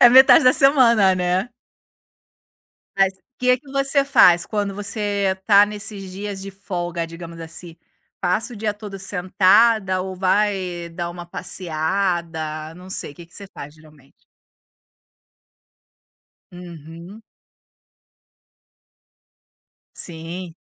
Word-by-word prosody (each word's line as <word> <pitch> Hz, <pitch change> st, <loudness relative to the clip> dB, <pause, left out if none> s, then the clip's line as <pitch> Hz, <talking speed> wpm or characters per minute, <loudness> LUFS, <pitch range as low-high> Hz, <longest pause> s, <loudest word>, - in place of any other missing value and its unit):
É 240 Hz, -, +9 dB
metade 265 Hz, +4 st, +7 dB
da 255 Hz, -, +7 dB
semana, 235 Hz, -9 st, +4 dB
né. 180 Hz, +4 st, -1 dB, 1.5 s
Mas 195 Hz, 0 st, +3 dB, 0.2 s
que 250 Hz, 0 st, +2 dB
que 270 Hz, +1 st, -16 dB
você 275 Hz, 0 st, +2 dB
faz 175 Hz, -11 st, +5 dB
quando 205 Hz, -2 st, -2 dB
você 205 Hz, -1 st, -1 dB
está 200 Hz, +1 st, +5 dB
nesses 205 Hz, -2 st, -6 dB
dias 200 Hz, 0 st, -6 dB
de 195 Hz, 0 st, -8 dB
folga, 175 Hz, -3 st, -4 dB
digamos 165 Hz, 0 st, -10 dB
assim. 165 Hz, +1 st, -8 dB, 0.4 s
Passa 200 Hz, +7 st, -1 dB
o -, -, -9 dB
dia 210 Hz, 0 st, -2 dB
todo 205 Hz, -2 st, -9 dB
sentada 190 Hz, +1 st, +2 dB
ou 190 Hz, 0 st, -5 dB
vai 185 Hz, -2 st, -1 dB
dar 170 Hz, +1 st, -5 dB
uma 175 Hz, 0 st, -9 dB
passeada, 165 Hz, -3 st, -3 dB
não 180 Hz, +1 st, -13 dB
sei, 145 Hz, -, -5 dB
que 170 Hz, -, -13 dB
que 165 Hz, -, -25 dB
você 200 Hz, -1 st, -8 dB
faz, 145 Hz, +1 st, -9 dB
geralmente? 155 Hz, -3 st, -22 dB, 2.3 s
Uhum. 170 Hz, +3 st, -11 dB, 2.7 s
Sim. 170 Hz, +1 st, -6 dB
185 Hz, 110 wpm, -21 LUFS, 170-205 Hz, 2.7 s, É